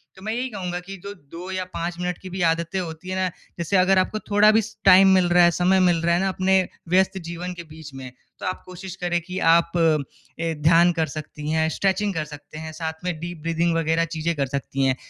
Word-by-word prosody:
तो 190 - -15
मैं 220 - -2
यही 255 +2 -2
कहूँगा 180 -4 -4
कि 195 +2 -9
जो 200 0 -6
2 175 +1 -11
या 185 0 -2
5 170 +1 -3
मिनट 180 -1 -2
की 185 - -8
भी 185 +1 -5
आदतें 170 +3 0
होती 170 0 -6
हैं 185 - -2
ना, 185 0 +1 0.3
जैसे 175 +3 0
अगर 185 +1 +4
आपको 215 +3 -1
थोड़ा 210 0 +4
भी 220 +1 +4
स 215 +1 -10
टाइम 190 0 +8
मिल 185 -1 +3
रहा 175 0 +5
है, 175 - +6
समय 180 +2 +3
मिल 175 -2 +4
रहा 170 +1 +2
है - - +1
ना 195 - +1
अपने 190 0 +2 0.2
व्यस्त 190 +2 +3
जीवन 175 +1 -5
के 170 -1 -8
बीच 155 -2 -12
में, 130 -1 -8 0.3
तो - - -6
आप 185 - -3
कोशिश 185 0 -8
करें 175 0 +1
कि 180 +2 -7
आप 170 0 +4
अ, 160 0 -1
ध्यान 170 +2 +6
कर 165 -1 0
सकती 150 0 -7
हैं, 160 0 +2
स्ट्रेचिंग 195 +3 0
कर 160 -3 -2
सकते 150 0 -11
हैं, 160 0 -6
साथ 160 +1 -6
में 175 -3 -2
डीप 170 -1 -7
ब्रीदिंग 165 +1 +1
वग़ैरह 165 0 +1
चीज़ें 165 +1 -1
कर 140 -2 -1
सकती 135 0 -2
हैं। 130 - +2
175 Hz, 240 wpm, -23 LUFS, 160-185 Hz, 0.3 s, टाइम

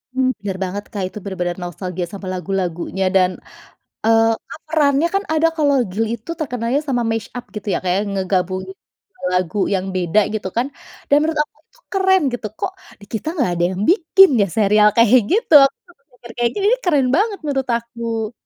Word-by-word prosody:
Mmm, 260 0 +2
bener 195 -2 -4
banget 200 +2 -4
Kak 200 -3 -3
itu 210 - -11
benar-benar 180 -3 -3
nostalgia 180 +1 -4
sama 195 0 -9
lagu-lagunya 185 0 -2
dan, 185 -1 +4 0.7
eee, 225 0 +4 0.2
kan - - -9
perannya 300 0 +2
kan 395 - +1
ada 320 +1 +3
kalau 285 -2 +3
Glee 225 +4 -1
itu 235 +9 -9
terkenalnya 250 -2 -1
sama 245 -3 0
mash-up 225 +2 -5
gitu 210 0 -7
ya - - -1
kayak 185 +2 +1
ngegabung 185 -1 -1
2 380 - -14
lagu 180 +2 -1 0.2
yang 190 0 -2
beda 180 +3 +2
gitu 210 -3 -3
kan 250 +3 +1 0.4
dan 285 - +5
menurut 310 -1 0
aku 370 - -24 0.2
tuh - - -27
keren 380 -1 +3
gitu, 230 -3 -3
kok 380 - -2 0.3
di 205 - -14
kita 220 - -4
nggak 260 - +1
ada 175 0 -1
yang 190 - -4
bikin 380 +1 +6
ya 200 - +2
serial 210 0 +5
kayak 235 +2 +6
gitu, 440 -4 +1
aku 275 - -2
kepikir 250 -6 -16
kayak, 240 0 +2
ih 425 +5 +2
keren 290 -7 +3
banget 410 +1 0
menurut 270 -3 -1
aku. 230 -1 -4
230 Hz, 180 wpm, -19 LUFS, 190-295 Hz, 0.7 s, bikin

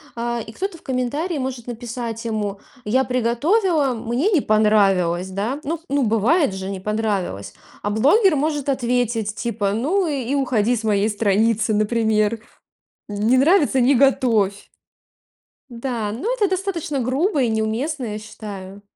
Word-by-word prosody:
а, 235 0 -2
и 220 - -10
кто-то 385 - -4
в - - -21
комментарии 285 +7 -2
может 255 -3 -4
написать 235 -1 -5
ему: 210 -3 -2 0.3
"Я 260 +5 +2
приготовила, 280 - +1
мне 240 - -1
не 340 -8 +3
понравилось". 195 -5 +2
Да, 210 +9 -3
ну 325 +4 -3
ну, 280 -1 +1
бывает 225 - +2
же, 190 0 -5
не 195 - -5
понравилось. 200 - -2 0.3
А 205 - 0
блогер 305 - +4
может 290 -1 -1
ответить 240 -5 0
типа: 205 -4 -2
"Ну 330 - +1
и 275 -4 -2
уходи 245 -4 +1
с 230 - -4
моей 210 -1 +2
страницы", 215 +1 +1
например. 215 0 +1 0.7
Не 215 +5 +1
нравится, 290 -1 +4
не 255 +3 +4
готовь. 230 -7 +2 1.0
Да, 235 -4 -3
но 380 - -2
это 435 -5 +1
достаточно 365 -7 -2
грубо 275 - +1
и 245 - +2
неуместно, 225 +6 -1
я 210 -1 -4
считаю. 205 -2 -9
235 Hz, 140 wpm, -21 LUFS, 215-275 Hz, 1.0 s, блогер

